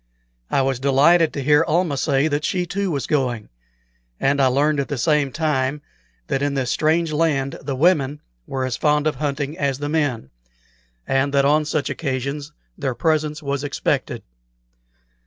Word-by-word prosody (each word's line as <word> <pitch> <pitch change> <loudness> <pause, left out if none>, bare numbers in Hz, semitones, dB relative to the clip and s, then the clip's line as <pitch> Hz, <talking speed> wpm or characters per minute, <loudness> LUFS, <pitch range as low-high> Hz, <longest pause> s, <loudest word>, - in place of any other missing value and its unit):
I 135 - +2
was 135 -2 -1
delighted 150 +5 +4
to 140 - -4
hear 150 +3 +4
Almah 165 -1 +1
say 135 +2 +1
that 145 0 -1
she 180 +1 0
too 195 +2 -2
was 140 -5 -2
going; 125 -7 -1 0.7
and 140 +1 +2
I 135 - +5
learned 145 +3 +2
at 140 - -1
the 145 - -3
same 150 0 +1
time 145 -1 -1 0.4
that 135 - -1
in 140 0 0
this 130 -3 -1
strange 160 +1 +1
land 150 -4 0
the 135 -1 -3
women 150 -2 +2 0.3
were 130 -1 -2
as 125 -3 -3
fond 150 0 +2
of 155 -3 0
hunting 145 +1 -2
as 140 -2 0
the 145 +1 -4
men, 145 - -1 0.7
and 135 +1 +1
that 140 0 +4
on 150 +2 +3
such 150 -1 -1
occasions 140 0 -3 0.2
their 135 -3 -3
presence 155 +2 0
was 140 0 -2
expected. 145 -1 -2
145 Hz, 170 wpm, -21 LUFS, 135-155 Hz, 0.7 s, I